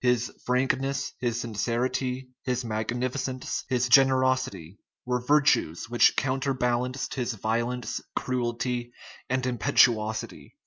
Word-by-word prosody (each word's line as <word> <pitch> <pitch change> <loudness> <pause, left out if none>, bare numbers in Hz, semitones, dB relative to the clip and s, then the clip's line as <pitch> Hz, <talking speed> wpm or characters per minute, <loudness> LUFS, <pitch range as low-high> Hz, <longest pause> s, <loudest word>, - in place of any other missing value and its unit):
His 125 -1 +1
frankness, 135 +2 0
his 120 -1 -1
sincerity, 125 +3 -2
his 125 -1 -1
magnificence, 125 +4 -2
his 125 -1 +1
generosity, 130 - +3 0.3
were 125 0 0
virtues 135 - +2
which 120 - +5
counterbalanced 130 -1 -1
his 125 -3 -2
violence, 115 +3 -2
cruelty, 120 -1 -2 0.4
and 130 0 0
impetuosity. 110 -2 +1
125 Hz, 95 wpm, -27 LUFS, 120-130 Hz, 0.4 s, which